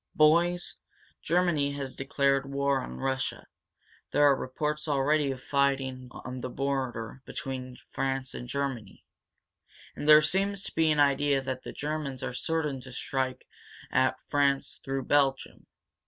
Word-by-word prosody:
Boys, 170 Hz, +3 st, +3 dB, 0.4 s
Germany 165 Hz, -4 st, +2 dB
has 135 Hz, -2 st, -5 dB
declared 135 Hz, 0 st, +1 dB
war 140 Hz, 0 st, +1 dB
on 60 Hz, +1 st, -7 dB
Russia. 135 Hz, -, -2 dB, 0.6 s
There 145 Hz, -, +3 dB
are 145 Hz, -1 st, +6 dB
reports 150 Hz, +4 st, -3 dB
already 145 Hz, +1 st, +2 dB
of 130 Hz, -1 st, -5 dB
fighting 135 Hz, -2 st, 0 dB
on 125 Hz, 0 st, -7 dB
the 125 Hz, -, -4 dB
border 130 Hz, -2 st, -3 dB
between 130 Hz, -2 st, -6 dB
France 135 Hz, -1 st, -2 dB
and 125 Hz, -, -7 dB
Germany. 130 Hz, -8 st, -4 dB, 0.9 s
And 145 Hz, -, -5 dB
there 155 Hz, 0 st, +9 dB
seems 195 Hz, +4 st, 0 dB
to -, -, -7 dB
be 160 Hz, -1 st, +3 dB
an 150 Hz, -1 st, +2 dB
idea 140 Hz, 0 st, +3 dB
that 130 Hz, -1 st, -3 dB
the -, -, -7 dB
Germans 150 Hz, -3 st, -4 dB
are -, -, -3 dB
certain 150 Hz, -1 st, -1 dB
to 130 Hz, -, -11 dB
strike 130 Hz, 0 st, -2 dB, 0.5 s
at 130 Hz, 0 st, +3 dB
France 140 Hz, -1 st, +1 dB
through 135 Hz, -1 st, -3 dB
Belgium. 135 Hz, -2 st, +1 dB
140 Hz, 140 wpm, -29 LUFS, 130-150 Hz, 0.9 s, there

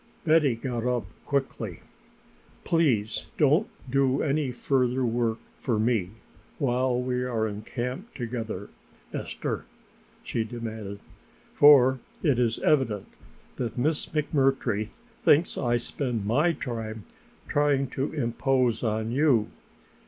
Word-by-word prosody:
Betty 155 Hz, -6 st, +4 dB
got 120 Hz, 0 st, -3 dB
up 125 Hz, -3 st, 0 dB, 0.2 s
quickly. 140 Hz, -1 st, -2 dB, 0.8 s
"Please 125 Hz, -11 st, +1 dB
don't 150 Hz, +8 st, +4 dB, 0.2 s
do 135 Hz, +1 st, +2 dB
any 145 Hz, -2 st, 0 dB
further 125 Hz, 0 st, +1 dB
work 115 Hz, -1 st, 0 dB, 0.2 s
for 120 Hz, -4 st, 0 dB
me 110 Hz, -4 st, +1 dB, 0.5 s
while 125 Hz, -2 st, +1 dB
we 125 Hz, 0 st, -1 dB
are 115 Hz, -3 st, 0 dB
in 105 Hz, 0 st, -5 dB
camp 125 Hz, -, -5 dB
together, 115 Hz, -5 st, -4 dB, 0.4 s
Esther," -, -, -4 dB, 0.6 s
she 115 Hz, -, -1 dB
demanded, 110 Hz, -3 st, -6 dB, 0.5 s
"for 135 Hz, -3 st, +7 dB, 0.2 s
it 140 Hz, -7 st, +3 dB
is 115 Hz, -2 st, +2 dB
evident 120 Hz, -9 st, +1 dB, 0.5 s
that 120 Hz, -3 st, -3 dB
Miss 150 Hz, +5 st, +1 dB
McMurtry 135 Hz, -8 st, +1 dB, 0.4 s
thinks 160 Hz, +4 st, +4 dB
I 120 Hz, -2 st, +1 dB
spend 120 Hz, -3 st, -3 dB
my 150 Hz, +11 st, +3 dB
time 110 Hz, -6 st, -5 dB, 0.4 s
trying 145 Hz, -2 st, +2 dB
to 135 Hz, +2 st, -2 dB
impose 125 Hz, -3 st, +1 dB
upon 110 Hz, -1 st, -1 dB
you. 130 Hz, -5 st, +3 dB
125 Hz, 115 wpm, -27 LUFS, 115-140 Hz, 0.8 s, for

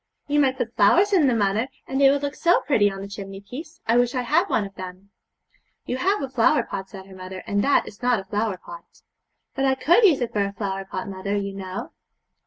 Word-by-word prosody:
'You 295 Hz, 0 st, +1 dB
might 265 Hz, -2 st, +2 dB
put 240 Hz, -2 st, -3 dB
flowers 355 Hz, -, +4 dB
in 335 Hz, -7 st, +5 dB
them, 245 Hz, -3 st, +2 dB
mother, 210 Hz, +3 st, +1 dB, 0.2 s
and 270 Hz, +1 st, -2 dB
they 275 Hz, -, +7 dB
would 280 Hz, +1 st, +1 dB
look 285 Hz, 0 st, -2 dB
so 345 Hz, +3 st, +3 dB
pretty 210 Hz, -8 st, +3 dB
on 195 Hz, 0 st, -7 dB
the 200 Hz, -, -6 dB
chimney 195 Hz, -1 st, -8 dB
piece. 270 Hz, +11 st, -10 dB
I 230 Hz, +2 st, +3 dB
wish 245 Hz, +1 st, +2 dB
I 250 Hz, -, 0 dB
had 335 Hz, +10 st, +2 dB
one 210 Hz, -, +1 dB
of 195 Hz, -, -10 dB
them.' 185 Hz, +1 st, -10 dB, 0.7 s
'You 250 Hz, -, -2 dB
have 385 Hz, +4 st, +1 dB
a -, -, -2 dB
flower 240 Hz, -2 st, +3 dB
pot,' 195 Hz, -3 st, -6 dB
said 190 Hz, -2 st, -10 dB
her 195 Hz, -, -14 dB
mother, 185 Hz, 0 st, -8 dB
'and 205 Hz, 0 st, 0 dB
that 280 Hz, -, +3 dB
is 205 Hz, -, -12 dB
not 245 Hz, -2 st, +2 dB
a 195 Hz, -, -9 dB
flower 210 Hz, -1 st, -1 dB
pot.' 170 Hz, -1 st, -13 dB, 0.5 s
'But 270 Hz, -, 0 dB
I 265 Hz, 0 st, +3 dB
could 320 Hz, -, +4 dB
use 340 Hz, -9 st, +5 dB
it 245 Hz, -2 st, -3 dB
for 205 Hz, -, +1 dB
a 200 Hz, 0 st, -3 dB
flower 195 Hz, -2 st, -4 dB
pot, 190 Hz, 0 st, -5 dB
mother, 195 Hz, +1 st, -3 dB
you 200 Hz, -1 st, -2 dB
know.' 190 Hz, -1 st, -6 dB
220 Hz, 245 wpm, -24 LUFS, 195-270 Hz, 0.7 s, they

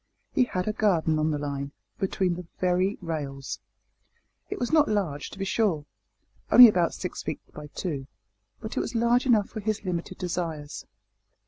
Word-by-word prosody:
He 255 Hz, -, +4 dB
had 185 Hz, -5 st, -3 dB
a 215 Hz, -, +1 dB
garden 165 Hz, -7 st, +2 dB
on 155 Hz, +1 st, +2 dB
the 150 Hz, -, 0 dB
line 140 Hz, -1 st, -4 dB, 0.3 s
between 190 Hz, -2 st, 0 dB
the 175 Hz, 0 st, -7 dB
very 185 Hz, +2 st, +1 dB
rails! 140 Hz, -4 st, -4 dB, 0.9 s
It -, -, -3 dB
was 245 Hz, -, -1 dB
not 310 Hz, -2 st, +5 dB
large, 175 Hz, -9 st, -1 dB
to -, -, -11 dB
be 195 Hz, -, -2 dB
sure, 190 Hz, -8 st, +1 dB, 0.7 s
only 245 Hz, -1 st, +12 dB
about 180 Hz, -6 st, +2 dB
six -, -, -5 dB
feet -, -, -4 dB
by 150 Hz, 0 st, -8 dB
two 145 Hz, -3 st, -4 dB, 0.5 s
but 220 Hz, -, -6 dB
it -, -, +1 dB
was -, -, -3 dB
large 235 Hz, +3 st, +3 dB
enough 220 Hz, -5 st, +4 dB
for 220 Hz, -, -6 dB
his 215 Hz, 0 st, -2 dB
limited 180 Hz, 0 st, -3 dB
desires. 165 Hz, -5 st, -4 dB
180 Hz, 175 wpm, -27 LUFS, 155-215 Hz, 0.9 s, only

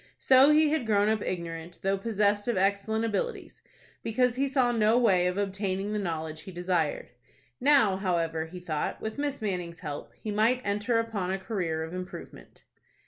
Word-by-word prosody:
So 265 Hz, +2 st, +6 dB
he 305 Hz, 0 st, +5 dB
had 305 Hz, -7 st, 0 dB
grown 205 Hz, -1 st, +3 dB
up 220 Hz, -1 st, +1 dB
ignorant, 170 Hz, -1 st, -5 dB
though 195 Hz, +1 st, +2 dB
possessed 205 Hz, 0 st, 0 dB
of 235 Hz, -5 st, 0 dB
excellent 200 Hz, +4 st, +1 dB
abilities, 345 Hz, -, -3 dB, 0.4 s
because 245 Hz, +2 st, +1 dB
he 275 Hz, +2 st, 0 dB
saw 260 Hz, -3 st, +2 dB
no 225 Hz, 0 st, +3 dB
way 190 Hz, -7 st, +4 dB
of 180 Hz, +1 st, -2 dB
obtaining 195 Hz, 0 st, -2 dB
the 210 Hz, -, -1 dB
knowledge 160 Hz, -4 st, -4 dB
he 190 Hz, -, -9 dB
desired. 175 Hz, -3 st, -1 dB, 0.5 s
Now, 260 Hz, -8 st, +4 dB
however, 165 Hz, -4 st, -1 dB
he 180 Hz, +2 st, -9 dB
thought, 160 Hz, -4 st, -3 dB
with 220 Hz, +5 st, -5 dB
Miss 285 Hz, -4 st, -2 dB
Manning's 180 Hz, -4 st, -3 dB
help, 150 Hz, -4 st, -6 dB
he 215 Hz, -, -4 dB
might 230 Hz, +5 st, +2 dB
enter 210 Hz, +4 st, 0 dB
upon 225 Hz, -5 st, -2 dB
a 190 Hz, -, 0 dB
career 185 Hz, -5 st, -2 dB
of 160 Hz, +2 st, -7 dB
improvement. 185 Hz, 0 st, -9 dB
200 Hz, 175 wpm, -28 LUFS, 180-230 Hz, 0.5 s, So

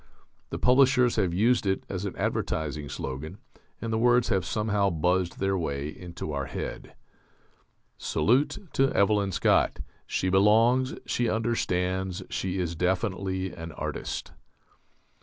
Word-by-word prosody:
The -, -, -4 dB
publishers 125 Hz, -1 st, +4 dB
have 95 Hz, -5 st, +2 dB
used 110 Hz, +5 st, +2 dB
it 95 Hz, 0 st, 0 dB
as 95 Hz, 0 st, -4 dB
an 100 Hz, -, -4 dB
advertising 75 Hz, -2 st, -2 dB
slogan, 70 Hz, +7 st, -5 dB, 0.4 s
and 115 Hz, -1 st, -3 dB
the 110 Hz, -, +1 dB
words 120 Hz, 0 st, +4 dB
have 95 Hz, -5 st, +1 dB
somehow 105 Hz, -2 st, +1 dB
buzzed 90 Hz, +2 st, 0 dB
their 95 Hz, 0 st, 0 dB
way 70 Hz, -5 st, -2 dB
into 85 Hz, -1 st, -7 dB
our 70 Hz, -2 st, -3 dB
head: -, -, -6 dB, 1.0 s
"Salute 140 Hz, -, +1 dB
to 135 Hz, 0 st, +3 dB
Evelyn 100 Hz, -1 st, +2 dB
Scott: -, -, +2 dB, 0.3 s
she 95 Hz, -, 0 dB
belongs, 115 Hz, +7 st, +4 dB
she 120 Hz, -2 st, 0 dB
understands, 95 Hz, -5 st, -1 dB
she 95 Hz, 0 st, -2 dB
is 85 Hz, -2 st, -2 dB
definitely 95 Hz, +1 st, -1 dB
an 80 Hz, -1 st, -7 dB
artist." -, -, -4 dB
95 Hz, 130 wpm, -27 LUFS, 90-115 Hz, 1.0 s, publishers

